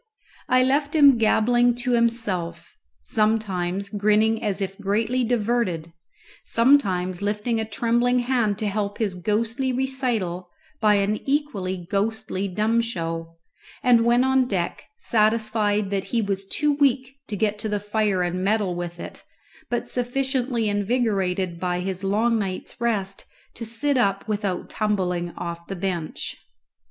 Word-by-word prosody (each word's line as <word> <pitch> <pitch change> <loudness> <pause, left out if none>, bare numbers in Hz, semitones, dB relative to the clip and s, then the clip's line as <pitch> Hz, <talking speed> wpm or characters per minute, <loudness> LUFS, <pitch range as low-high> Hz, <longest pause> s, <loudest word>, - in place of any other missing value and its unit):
I 255 0 +5
left 285 +3 +1
him 280 -5 +7
gabbling 240 +2 +3
to 245 +1 -2
himself, 230 -7 -1 0.3
sometimes 200 - 0
grinning 215 +2 +2
as 205 -3 -1
if 195 0 -4
greatly 220 +5 0
diverted, 220 -8 0 0.5
sometimes 195 -8 +2
lifting 210 +3 -1
a 220 - -1
trembling 240 +3 +1
hand 240 -5 +1
to 215 - -2
help 205 0 -2
his 210 -4 -1
ghostly 225 +8 -1
recital 245 -9 -2 0.3
by 210 -1 +4
an 200 +1 +1
equally 195 - -1
ghostly 200 -1 -1
dumb 215 +5 +1
show, 165 -6 -4 0.5
and 240 -2 +5
went 240 +2 +4
on 265 -1 +3
deck, 185 -6 -2
satisfied 215 - +1
that 195 -1 -1
he 235 - -1
was 195 -2 -2
too 295 +7 +1
weak 270 -2 +1
to 210 - -4
get 210 0 0
to 215 0 -2
the 210 0 0
fire 205 -2 0
and 180 +1 -2
meddle 205 -2 +1
with 175 0 -5
it, - - -9 0.5
but 240 0 -2
sufficiently 250 -2 -1
invigorated 195 -5 0
by 180 0 -1
his 190 0 -4
long 220 +4 +2
night's 190 -3 -4
rest 200 -5 -1 0.3
to 230 - -6
sit 255 +4 +1
up 195 -3 +1
without 205 -4 -2
tumbling 180 -5 -1
off 170 -1 -6
the 195 - -4
bench. 175 -3 -4
215 Hz, 140 wpm, -24 LUFS, 190-240 Hz, 0.5 s, him